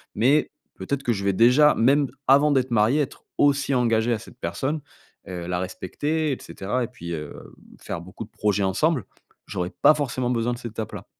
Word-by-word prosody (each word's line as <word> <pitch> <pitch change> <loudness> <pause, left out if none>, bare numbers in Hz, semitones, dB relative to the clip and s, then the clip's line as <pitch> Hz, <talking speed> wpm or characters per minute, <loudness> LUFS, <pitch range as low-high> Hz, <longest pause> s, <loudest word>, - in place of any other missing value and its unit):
mais 135 +8 +3 0.3
peut-être 140 -1 -3
que 120 - +1
je 100 -1 -4
vais 100 -1 +2
déjà, 125 +8 +5
même 140 +4 +3 0.2
avant 140 +3 +6
d'être 130 -2 +1
marié, 115 +7 +3
être 135 - -5
aussi 140 -1 +2
engagé 115 -1 +2
à - - 0
cette 125 +2 -14
personne, 145 +3 -2 0.5
heu, 90 -2 -6
la 90 0 -1
respecter, 145 - -2
et 130 - -2
cetera 115 +6 -3
et - - -2
puis, 85 -9 -9
heu, 75 -2 -6 0.5
faire 85 - -5
beaucoup 95 +5 -9
de - - -23
projets 105 -1 0
ensemble, 125 - +1 0.4
j'aurais 90 +1 -4
pas 155 - +8
forcément 130 -4 -2
besoin 120 0 0
de - - -5
cette 120 -2 -7
étape-là. 110 -1 -6
120 Hz, 195 wpm, -24 LUFS, 105-140 Hz, 0.5 s, pas